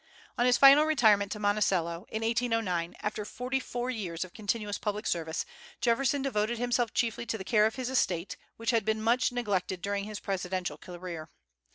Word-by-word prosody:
On 245 - +2
his 245 - +5
final 280 +2 +8
retirement 215 -10 +4
to - - -3
Monticello, 195 -4 0
in 220 +1 -3
1809, 225 -7 0
after 210 0 -2
forty 250 +5 -3
four 245 -1 -3
years 185 -7 -4
of 180 - -15
continuous 210 -1 -2
public 210 0 -3
service, 160 -2 -1 0.3
Jefferson 265 +3 +1
devoted 235 -3 0
himself 240 -1 0
chiefly 235 0 -1
to 225 - -1
the 190 - -6
care 215 +1 +4
of 220 - -5
his 255 -2 -3
estate, 180 -8 0 0.2
which 230 +1 0
had 230 -3 +2
been 220 +1 0
much 240 +3 +3
neglected 200 -6 -1
during 200 +1 -2
his 215 -1 -6
presidential 185 -1 -3
career. 175 -3 -8
215 Hz, 180 wpm, -29 LUFS, 190-240 Hz, 0.3 s, final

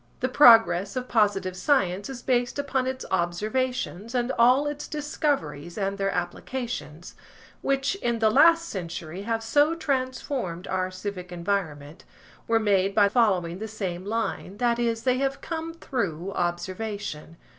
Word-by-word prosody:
The 255 - 0
progress 225 -8 +6
of 255 0 -3
positive 200 -5 +1
science 200 -4 +1
is 255 -2 -7
based 245 0 +1
upon 270 -2 -1
its 260 0 -4
observations 215 +5 -1
and 245 +1 +1
all 250 +4 +4
its 290 0 -4
discoveries 275 - -2
and 195 0 -2
their 195 0 +1
applications, 180 - -4 0.5
which 275 +2 +1
in 240 -12 -1
the 220 -1 +3
last 335 +6 +5
century 170 - -6
have 225 +2 -2
so 290 +8 +3
transformed 255 - -2
our 185 0 -1
civic 185 -1 -6
environment, 170 -4 -3 0.4
were 230 0 +3
made 200 -2 +2
by 205 -2 +5
following 190 -6 +1
the 220 - -4
same 190 -5 -4
line–that 230 +2 -1
is, 230 -1 0
they 255 -1 +2
have 275 0 -1
come 325 0 -4
through 195 - -3
observation. 180 -2 -4
220 Hz, 140 wpm, -26 LUFS, 185-255 Hz, 0.5 s, progress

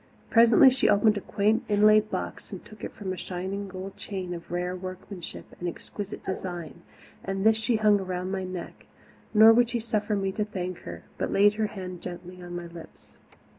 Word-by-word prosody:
Presently 235 +3 +7
she 255 - +2
opened 210 +1 +4
a - - -3
quaint, 215 +4 +1
inlaid 215 +1 +5
box - - -5
and - - -8
took 215 - -14 0.2
from 195 -3 -4
it - - -1
a - - -7
shining 190 +3 -4
gold 190 +1 -8
chain 185 -3 -5
of 170 -1 -8
rare 180 +1 -2
workmanship 185 0 -8
and 175 - -2
exquisite 205 +4 -7
design, 175 -3 -5 0.4
and 195 +1 -2
this 220 0 +6
she 220 +2 +1
hung 210 -1 +4
around 185 -1 -3
my 190 -1 -2
neck, 185 -1 -7 0.4
nor 220 +1 +8
would 240 0 +4
suffer 220 -3 -1
me 195 -1 -1
to 210 +2 -1
thank 185 -4 -5
her - - -7 0.2
but - - -1
laid 205 +1 +5
her 215 0 0
hand 185 -3 -7
gently 180 0 -8
on 175 0 -7
my 175 0 -5
lips. 170 -1 -13
195 Hz, 190 wpm, -27 LUFS, 180-215 Hz, 0.4 s, nor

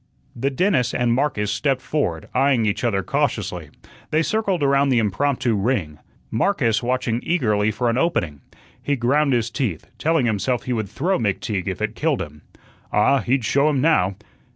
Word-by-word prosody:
The 135 +4 0
dentist 140 - +1
and 120 -1 +2
Marcus 120 -6 0
stepped 135 +4 0
forward, 90 - -2
eyeing 130 -3 +3
each 105 +3 -1
other 100 -5 +1
cautiously. - - -2 0.4
They 155 +1 +2
circled 200 -5 0
around 140 0 +3
the 130 - +3
impromptu 115 +4 +1
ring. 100 - -1 0.3
Marcus 115 - +1
watching 120 -1 -1
eagerly 110 -11 +1
for 110 +3 -1
an 115 +2 +1
opening. 85 - -1 0.4
He 145 - 0
ground 140 +4 +2
his 120 -2 0
teeth, 105 - -2
telling 160 -4 +2
himself 115 +3 0
he 125 - -2
would 110 -4 -2
throw 165 - 0
McTeague 100 -3 -2
if 95 +2 -3
it 110 0 -1
killed 150 +1 0
him. 75 -2 -12 0.5
Ah, 135 +7 +3
he'd 125 -1 0
show 140 +6 +3
him 145 -3 +1
now. 130 - +2
120 Hz, 170 wpm, -22 LUFS, 105-140 Hz, 0.5 s, eyeing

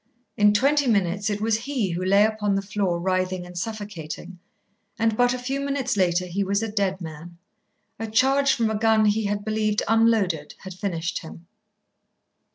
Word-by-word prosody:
In 210 0 +5
twenty 275 +6 +2
minutes 200 -2 +1
it 205 -1 -2
was 225 +1 0
he 235 -10 -1
who 175 +2 -3
lay 200 +3 +5
upon 210 -2 0
the 195 - -1
floor 195 -3 -1
writhing 185 0 -1
and 180 0 -12
suffocating, 185 -3 -6 0.6
and 225 -1 +1
but 245 +1 +3
a 255 - -1
few 265 +2 -3
minutes 280 -4 -1
later 180 -2 +1
he 185 +3 -2
was 200 +2 0
a 225 - -3
dead 195 -2 -1
man. 165 +1 -9 0.6
A 225 - -3
charge 270 +5 +3
from 230 -3 0
a - - -1
gun 220 -1 +4
he 210 +1 +2
had 205 0 -2
believed 215 -1 0
unloaded 220 -9 +2
had 190 -1 -7
finished 175 -2 -3
him. 165 +1 -12
205 Hz, 175 wpm, -24 LUFS, 185-225 Hz, 0.6 s, In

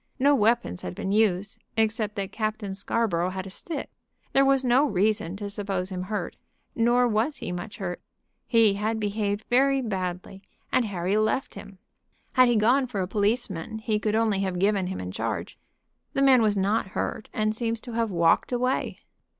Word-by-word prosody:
No 280 +2 +4
weapons 215 - +1
had 90 0 -6
been 195 - -3
used, 205 -2 +1
except 220 -1 0
that 195 -1 -3
Captain 215 -2 -3
Scarborough 190 -3 0
had 190 0 -5
a 195 - -7
stick. 315 - -5 0.4
There 275 - +5
was 270 -1 +3
no 260 +4 +4
reason 205 -2 +1
to 205 0 -5
suppose 195 -2 -3
him 180 -1 -3
hurt, 210 +2 -4 0.4
nor 240 +2 +3
was 230 +6 0
he - - -5
much 180 +4 -6
hurt. 180 -3 -4 0.5
He 225 -4 +5
had 215 +2 -1
behaved 205 0 -2
very 275 +2 +3
badly, 190 -4 -4 0.3
and 250 - +3
Harry 190 0 -1
left 215 +5 0
him. 200 -1 -11 0.6
Had 255 -1 +6
he 240 - +3
gone 250 +5 +3
for 210 -6 -3
a 180 - -2
policeman 205 -2 -1
he 220 -1 -1
could 210 0 0
only 220 -3 +2
have 190 -2 -1
given 195 0 +2
him 190 - -4
in 90 0 -5
charge. - - -4 0.5
The 275 - +2
man 260 -3 +6
was 210 -2 +2
not 200 +2 +1
hurt, - - -3
and 215 0 0
seems 230 0 -2
to 245 - -9
have 230 -1 0
walked 170 +2 +2
away." 255 +1 -1
215 Hz, 185 wpm, -26 LUFS, 195-235 Hz, 0.6 s, Had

